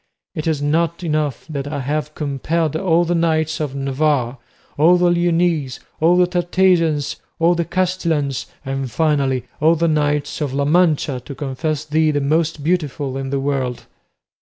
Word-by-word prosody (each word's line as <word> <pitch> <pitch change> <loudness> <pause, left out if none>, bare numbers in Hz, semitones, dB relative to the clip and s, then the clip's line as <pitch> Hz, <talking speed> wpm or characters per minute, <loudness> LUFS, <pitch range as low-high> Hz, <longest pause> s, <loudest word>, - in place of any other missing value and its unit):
It 155 - -4
is 150 -3 0
not 165 +3 0
enough 150 -5 -1
that 140 -3 -4
I 145 0 -3
have 150 +3 -3
compelled 155 +2 -1
all 175 0 +2
the 175 - 0
knights 160 -2 +1
of 145 -3 -3
Navarre, 135 -2 0 0.4
all 170 +5 +5
the 175 0 +3
Leonese, 170 -5 +1 0.2
all 170 +3 +4
the 180 - +5
Tartesians, 175 -4 +1 0.2
all 165 +1 +3
the 170 -1 -1
Castilians, 170 -6 -1 0.2
and 135 -1 -3
finally 140 -3 +1 0.2
all 160 +3 +4
the 170 +1 +1
knights 150 0 0
of 140 -3 -2
La 140 0 +1
Mancha, 155 -4 +2
to 140 - -8
confess 150 +3 -3
thee 155 +1 +2
the 145 -1 +1
most 155 +1 0
beautiful 150 -5 -1
in 135 0 -4
the 140 0 -1
world?" 135 -3 -2
155 Hz, 160 wpm, -19 LUFS, 140-170 Hz, 0.4 s, all